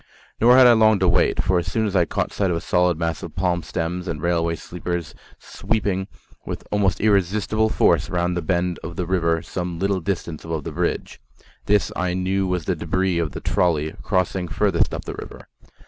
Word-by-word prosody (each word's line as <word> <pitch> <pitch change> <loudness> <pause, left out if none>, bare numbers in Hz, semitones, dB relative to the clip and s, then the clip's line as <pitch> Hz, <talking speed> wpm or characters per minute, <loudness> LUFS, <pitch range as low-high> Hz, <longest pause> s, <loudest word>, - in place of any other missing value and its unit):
Nor 120 +3 +6
had 130 - +8
I 120 - +8
long 110 -2 +5
to 95 -1 +1
wait; - - +2
for 90 -1 +2
I - - 0
soon 105 +5 -1 0.2
caught - - -2
sight 100 -2 0
of 85 - 0
a - - -4
solid 90 -2 +2
mass 85 -1 -2
of - - -8
palm 90 -1 0
stems 90 +3 -4
and 80 -4 -3
railway 85 0 0
sleepers 85 -2 -5 0.2
sweeping 100 -3 -2 0.4
with - - -7
almost 100 -4 +1
irresistible 105 +2 +2
force - - +2
round 90 0 0
the 90 - -1
bend 85 +1 -1
of 85 +1 -6
the 90 - -2
river 85 -2 +1
some 90 -2 -4
little 95 +1 0
distance 85 -3 -4
above 80 -2 -4
the - - -5
bridge. - - -3 0.5
This 105 0 +2
I 90 0 -1
knew 95 +1 0
was 90 -4 -2
the 90 - 0
debris 90 +2 0
of 80 -5 -2
the - - -6
trolley 80 -3 +1
crossing 90 0 0
furthest 95 +5 +1
up - - -5
the - - -5
river. - - -10
90 Hz, 195 wpm, -22 LUFS, 85-95 Hz, 0.5 s, had